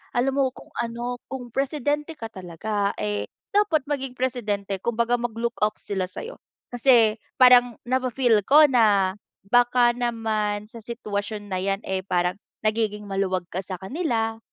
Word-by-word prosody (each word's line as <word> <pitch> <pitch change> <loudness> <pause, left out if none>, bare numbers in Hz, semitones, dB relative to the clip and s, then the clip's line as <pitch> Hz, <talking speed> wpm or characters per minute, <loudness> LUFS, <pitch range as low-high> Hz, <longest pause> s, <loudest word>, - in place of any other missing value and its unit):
alam 250 +3 +2
mo 275 -1 +3
kung - - -14
ano 240 +1 -3
kung 250 -3 -7
presidente 290 +4 -1
ka 225 - -6
talaga 200 +2 -2
eh 105 -1 -2 0.2
dapat 400 -8 +2
maging, 270 -3 -3
presidente 210 -6 -2
kumbaga 235 +1 +1
mag-look 235 0 -2
off 210 - +2
sila 190 -2 -2
sayo 460 - -8 0.3
kasi 240 -3 +4 0.2
parang 245 -2 +7
nafi-feel 255 -3 +2
ko 305 +2 +8
na 205 -7 +4 0.4
baka 245 +1 +4
naman 220 -3 -1
sa 230 - -10
sitwasyon 210 -2 -4
na 185 - 0
yan 195 +1 -1
eh 190 0 -1
parang 180 0 0 0.3
nagiging 215 -1 0
maluwag 195 -2 -1
ka 180 - -2
sa 185 0 -6
kanila. 225 - -1
230 Hz, 145 wpm, -24 LUFS, 200-250 Hz, 0.4 s, ko